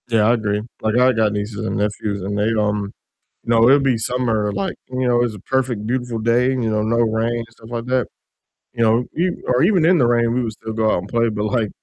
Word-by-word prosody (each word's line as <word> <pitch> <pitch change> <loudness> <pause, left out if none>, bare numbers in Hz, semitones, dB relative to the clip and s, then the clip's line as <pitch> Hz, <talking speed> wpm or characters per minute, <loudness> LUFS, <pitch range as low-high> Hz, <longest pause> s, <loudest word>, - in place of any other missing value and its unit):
Yeah, 115 -2 +3
I - - +5
agree, 105 -3 -1 0.2
like 110 +2 0
I 130 +1 +4
got 110 -2 +1
nieces 105 0 -4
and - - -2
nephews, 105 -1 -2
and 100 +2 -3
they, 105 +2 +1
um 105 -1 -1 0.5
you - - -9
know, 115 0 +5
it'll 140 +3 +6
be 135 -3 +2
summer, 115 -3 -1
like, 100 0 -3
you 130 0 -2
know, 120 -1 +3
it's 120 -2 -2
a 105 - -10
perfect 125 -2 -2
beautiful 120 -1 -2
day, 120 +3 +2
you 125 -4 -1
know, 105 -1 0
no 110 +2 0
rain 115 0 +1
and 115 0 -4
stuff 115 0 -16
like 115 -1 -4
that, 125 -2 0 0.7
you 115 - -4
know, 115 +2 +3
e 180 +3 +2 0.2
or 125 0 +2
even 180 -3 +3
in 180 +2 +5
the 125 -6 +3
rain 115 -1 +2
we 125 - 0
would 115 -2 -2
still 110 +1 -7
go 110 -1 +1
out - - +1
and 95 - -8
play, 115 -1 +1
but, 105 -1 -3
like, 110 -1 0
115 Hz, 255 wpm, -20 LUFS, 105-125 Hz, 0.7 s, it'll